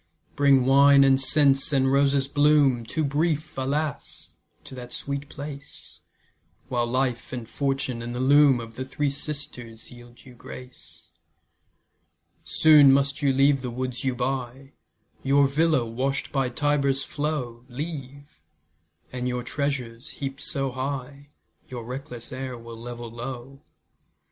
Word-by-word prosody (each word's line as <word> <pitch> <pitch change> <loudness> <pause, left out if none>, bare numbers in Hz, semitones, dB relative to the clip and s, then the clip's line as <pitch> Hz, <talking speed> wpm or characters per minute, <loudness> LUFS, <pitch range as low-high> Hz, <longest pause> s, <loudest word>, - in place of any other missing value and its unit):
Bring 140 -3 +4
wine 140 +1 +6
and 135 0 +4
scents, 135 0 +4
and 135 -1 +2
roses' 140 0 +2
bloom, 145 -5 +3
Too 155 +5 -1
brief, 155 +2 -1
alas! 140 +3 -4 0.3
to - - -12
that 125 -1 -9
sweet 140 +2 -5
place, 145 0 -9 0.7
While 120 -2 0
life, 125 -1 -1
and 120 -3 -6
fortune, 135 -3 -2
and 120 +1 -5
the - - -3
loom 140 0 +5
Of 115 -1 -9
the 130 - -3
Three 140 +2 -2
Sisters 125 -6 -7
yield 120 0 -15
you 130 - -13
grace. 125 +1 -12 1.3
Soon 150 -3 +6
must 140 +2 +1
you 140 -1 +3
leave 135 +1 +3
the 125 - -4
woods 125 0 -4
you 130 -2 0
buy, 130 +1 -4 0.5
Your 140 +1 +4
villa, 155 -2 +2
wash'd 130 +4 -2
by 135 -3 0
Tiber's 140 0 0
flow, 145 -6 -4
Leave, 140 0 -7 0.7
and 125 0 -3
your 125 -1 -2
treasures, 125 -3 -3
heap'd 135 0 -5
so 135 -2 -2
high, 135 +2 -5 0.4
Your 120 -2 -6
reckless 125 -1 -7
heir 130 -1 -5
will 115 0 -10
level 120 0 -8
low. 125 +3 -8
135 Hz, 135 wpm, -25 LUFS, 125-140 Hz, 1.3 s, wine